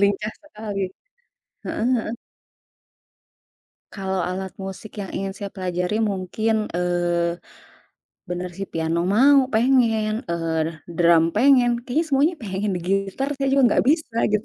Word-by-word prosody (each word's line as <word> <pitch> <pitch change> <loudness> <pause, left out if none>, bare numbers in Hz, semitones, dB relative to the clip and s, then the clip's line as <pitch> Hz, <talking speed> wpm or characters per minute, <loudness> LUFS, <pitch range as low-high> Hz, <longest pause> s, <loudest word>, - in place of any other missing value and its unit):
Lincah 200 +2 +1
sekali. 210 -8 -6 0.9
Heeh 220 - -2
heeh. 225 -2 -2 1.9
Kalau 190 -1 -2
alat 190 0 -4
musik 195 +2 -7
yang 195 - -5
ingin 195 0 -3
saya 200 -1 -6
pelajari 180 0 -2 0.2
mungkin 200 +4 -1 0.2
eee, 175 -1 0 0.9
bener 180 0 -3
si 195 - -2
piano, 165 +1 -1 0.2
mau 275 +5 +6
pengen, 225 -3 +3 0.2
eee, 165 -1 -1 0.4
drum 170 -1 +5
pengen, 250 0 +5
kayaknya 280 +7 0
semuanya 295 +5 +2
pengen 200 0 -2 0.2
gitar 195 +7 0
saya 275 0 0
juga 275 0 +4
enggak - - +2
bisa 310 -7 0 0.2
gitu. 210 +1 +1
200 Hz, 125 wpm, -23 LUFS, 180-240 Hz, 1.9 s, mau